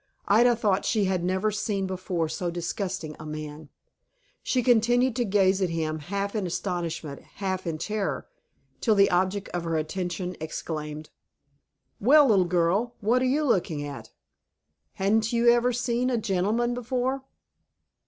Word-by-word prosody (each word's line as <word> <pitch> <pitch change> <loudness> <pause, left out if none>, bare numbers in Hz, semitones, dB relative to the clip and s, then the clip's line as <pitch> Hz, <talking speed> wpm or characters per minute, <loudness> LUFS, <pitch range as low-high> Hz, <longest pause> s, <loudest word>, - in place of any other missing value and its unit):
Ida 235 +4 +5
thought 205 -4 +1
she 215 -3 +1
had 185 -2 0
never 190 +4 +1
seen 205 -1 -1
before 185 -3 -2
so 175 +3 -3
disgusting 175 -2 -4
a 155 - -8
man. 150 0 -7 0.7
She 250 -2 0
continued 245 +1 +3
to 245 - +2
gaze 195 -1 +3
at 185 - +1
him, 160 -1 -2
half 200 +6 -3
in 205 -5 -1
astonishment, 170 -5 -4
half 190 -2 -3
in 160 -2 -2
terror, 210 +4 -3 0.5
till 220 -3 +2
the 200 -1 +5
object 190 +3 0
of 175 -1 -3
her 165 -1 -1
attention 180 +3 -3
exclaimed, 155 -1 -5 0.9
"Well, 290 +7 +6
little 195 -4 +4
girl, 180 +7 +1
what 230 +4 +2
you're 265 +4 +2
looking 170 - 0
at? 145 -1 -8 0.8
Hain't 215 +3 +1
you 235 0 +2
never 240 +1 +5
seen 245 +1 0
a 245 - +1
gentleman 215 +3 0
before?" 250 +2 -1
195 Hz, 145 wpm, -26 LUFS, 170-230 Hz, 0.9 s, Well